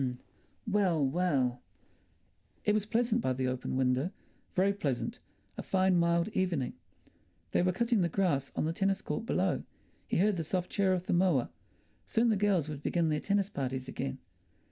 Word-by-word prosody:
Well, 190 -8 +2
well! 135 -5 +1 1.0
It 210 - +4
was 210 -1 0
pleasant 235 0 +1
by 130 - +1
the 130 0 -2
open 130 0 -2
window, 130 +4 +2 0.5
very 195 +2 +3
pleasant—a 140 -11 -5
fine 190 -1 +2
mild 170 +2 +2
evening. 175 - -1 0.8
They - - +3
were 180 +1 +3
cutting 230 +2 +1
the 170 - +2
grass 155 -7 0
on - - 0
the 160 - -1
tennis 195 +2 0
court 230 - -3
below; - - +1 0.4
he - - 0
heard 200 +2 +3
the 165 - -1
soft 180 +3 -2
churr 195 -2 +2
of 180 0 -4
the - - 0
mower. 175 -8 +3 0.6
Soon 230 +1 +2
the 220 - +3
girls 195 -6 +2
would 150 -2 -6
begin 170 +1 +1
their 150 -1 +1
tennis 200 +1 +1
parties 130 -1 -3
again. 135 0 -4
175 Hz, 165 wpm, -31 LUFS, 140-200 Hz, 1.0 s, It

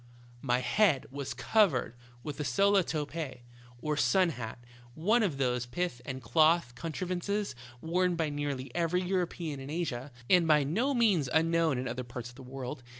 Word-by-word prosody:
" 120 0 -24
My 125 +1 +3
head 140 - +3
was 140 -1 -5
covered 165 - +2 0.3
with 145 0 -6
a - - 0
sola 195 +9 +3
topee, 150 -4 -4 0.4
or 150 0 0
sun 185 +4 +3
hat, 115 -7 -6 0.4
one 215 +9 +3
of 180 -10 0
those 125 -2 0
pith 170 -1 -3
and 130 -2 -5
cloth 155 +1 +3
contrivances 180 - -3 0.3
worn 180 +2 +1
by 160 -3 -1
nearly 140 -3 -3
every 175 +2 +1
European 175 -5 -2
in 135 +1 -8
Asia, 145 -5 -3 0.2
and 180 -3 +5
by 150 -2 +5
no 230 - 0
means 200 - +3
unknown 165 -2 +2
in 130 +1 -3
other 125 +2 -3
parts 120 -1 -7
of 120 - -15
the 135 - -11
world. 130 -1 -6
155 Hz, 170 wpm, -30 LUFS, 130-175 Hz, 0.4 s, and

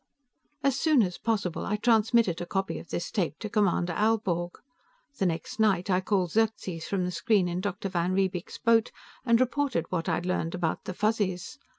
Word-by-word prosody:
"As 270 -1 +2
soon 300 -7 +4
as 180 -2 -3
possible, 205 -7 -1
I 210 - -1
transmitted 220 -4 +3
a 175 - -5
copy 195 0 -2
of - - -13
this 175 - -3
tape 170 -7 -1
to 215 - -5
Commander 190 -5 +1
Aelborg. 185 -4 0 0.6
The 190 - +3
next 165 +5 -4
night, 195 -4 +2
I 180 0 +3
called 185 -3 0
Xerxes 210 -7 -1
from 190 -2 -1
the 180 - -2
screen 205 -2 +2
on 175 +1 -2
Dr. 200 0 -3
van 180 -1 -1
Riebeek's 190 -2 -1
boat 230 0 +3 0.4
and 230 0 +5
reported 255 - 0
what 180 0 -1
I'd 170 +1 -1
learned 180 -2 -1
about 175 -3 -2
the 185 - -5
Fuzzies. 210 +2 -1
190 Hz, 185 wpm, -28 LUFS, 175-220 Hz, 0.6 s, and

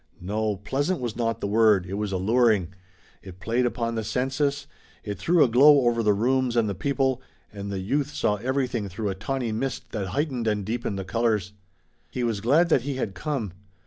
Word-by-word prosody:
No, 105 +3 -1
"pleasant" 140 - -2
was 120 -4 -4
not 115 -1 -1
the - - -1
word, 105 -3 +4
it 95 - -7
was 105 0 -2
alluring, 105 -1 +2 0.5
it 95 -1 -12
played 120 +5 0
upon 115 -1 -2
the 110 -1 -2
senses, 135 +4 -1 0.4
it 100 -3 -5
threw 170 - +4
a - - +4
glow 140 +5 +6
over 120 -2 +2
the 105 -2 +3
rooms 125 +3 +1
and 115 -2 +2
the 100 - -1
people, 135 +3 0 0.3
and 100 -1 -6
the 100 - -3
youth 135 +10 -1
saw 105 -7 0
everything 125 -3 -2
through 100 +3 -3
a - - -1
tawny 120 +4 -3
mist 130 +5 -4
that 100 -3 -3
heightened 130 - -2
and 105 -2 0
deepened 110 -2 -3
the 95 - -4
colors. 105 -2 0 0.6
He 125 - -3
was 115 -4 -1
glad 150 - +3
that 135 - +4
he 140 +2 -4
had 110 -6 -3
come. 130 - -3
115 Hz, 200 wpm, -25 LUFS, 100-130 Hz, 0.6 s, glow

